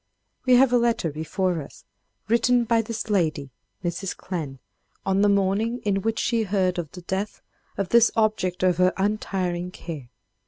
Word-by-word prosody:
We 250 - +7
have 250 0 +5
a 245 - +5
letter 230 -9 +1
before 170 +3 -1
us, 140 - -13 0.4
written 235 +2 +3
by 230 0 +2
this 225 0 -5
lady, 155 -8 0 0.3
Mrs. 180 +2 -3
Clemm, 155 -8 -5 0.5
on 195 0 +2
the 205 - +4
morning 200 +4 +1
in 195 -1 +1
which 225 +2 -1
she 230 0 +1
heard 190 -3 0
of 160 -4 -5
the 180 -1 -10
death 190 +4 -4 0.3
of 195 -3 -2
this 235 -1 +6
object 215 -5 +1
of 180 -2 +3
her 185 0 +3
untiring 190 -3 -1
care. 155 -8 -8
195 Hz, 165 wpm, -24 LUFS, 180-225 Hz, 0.5 s, We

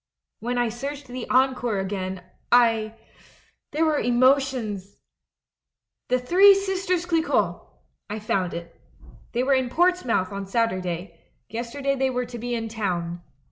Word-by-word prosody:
When 245 +2 -2
I 240 -1 +2
searched 275 +5 -6
the 250 -1 -7
Encore 255 -4 +2
again, 190 -1 -3 0.3
I 225 -2 +4 0.7
There 315 +2 +1
were 305 -2 +2
emotions! 245 -6 +1 1.1
"'The 255 - +2
Three 375 +10 +6
Sisters 380 -3 -1
CHcquot'! 330 -2 +1 0.5
I 210 - -3
found 190 -4 -1
it. 170 0 -9 0.5
They 245 +1 +1
were 275 +1 +3
in 260 -2 +1
Portsmouth 320 - +2
on 200 -1 -5
Saturday; 185 -5 -2 0.3
yester 235 +5 -5
day 275 0 +2
they 265 -1 +1
were 250 -1 -1
to 240 -1 -8
be 240 +1 -2
in 225 -1 -3
town. 175 -6 -3
245 Hz, 140 wpm, -24 LUFS, 205-275 Hz, 1.1 s, Three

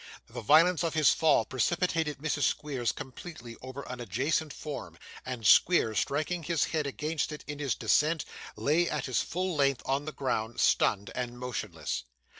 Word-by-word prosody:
The 120 +1 -8
violence 160 +8 +5
of 165 -2 -1
his 155 -2 +5
fall 150 -8 +3
precipitated 160 +2 0
Mrs. 150 0 -2
Squeers 135 -6 0
completely 130 -3 -9
over 130 +2 -7
an 125 0 -7
adjacent 135 - -1
form; 150 0 -7 0.3
and 125 -4 -5
Squeers 110 - +5
striking 155 +5 -1
his 165 -1 0
head 155 -3 -1
against 150 +5 -2
it 150 - -7
in 145 -1 -6
his 140 -3 0
descent, 155 +1 +2 0.3
lay 170 +4 +2
at 150 -3 -2
his 130 -3 +1
full 185 0 -2
length 140 -3 +2
on 135 +2 0
the 155 - -4
ground, 120 -5 -2
stunned 100 0 +2
and 120 -1 -4
motionless. 105 - -4
145 Hz, 165 wpm, -29 LUFS, 125-155 Hz, 0.3 s, violence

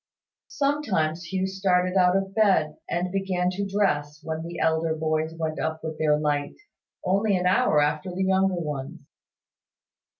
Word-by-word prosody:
Sometimes 190 - 0
Hugh 185 +3 -1
started 190 -1 +1
out 180 0 +4
of 195 0 -3
bed, 185 -8 +2
and 180 +1 -1
began 185 -2 0
to 200 +2 -3
dress, 150 -7 0
when 160 0 -4
the 170 +1 -7
elder 160 0 +1
boys 160 0 -1
went 160 -1 -3
up 160 0 -3
with 160 -1 -5
their 150 -1 +3
light, 145 -1 -1 0.5
only 195 +2 +2
an 180 - -2
hour 180 -4 +3
after 150 +5 0
the 185 +2 -2
younger 190 0 +2
ones. 150 -6 -5
175 Hz, 155 wpm, -25 LUFS, 155-190 Hz, 0.5 s, out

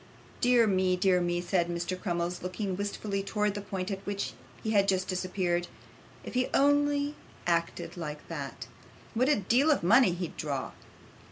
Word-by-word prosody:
'Dear 245 -1 +5
me, 185 -3 +2
dear 180 0 +3
me,' 175 0 0
said 175 0 +1
Mr. 175 +1 -2
Crummles, 175 -2 -2
looking 185 +1 -3
wistfully 200 0 -2
towards 210 +1 0
the 205 - -4
point 195 0 -4
at 195 0 -4
which 200 0 -3 0.3
he 220 - -1
had 200 -2 +4
just 185 -1 +1
disappeared; 180 -1 -1 0.6
'if - - -8
he 255 0 +1
only 285 +1 +3 0.3
acted 170 -1 -1
like 150 -3 -6
that, 140 -6 -6 0.5
what 255 +4 +2
a 300 - +5
deal 240 +9 +3
of 295 - +3
money 225 +1 +6
he'd 175 -1 -4
draw! 140 -3 -3
190 Hz, 165 wpm, -29 LUFS, 175-215 Hz, 0.6 s, money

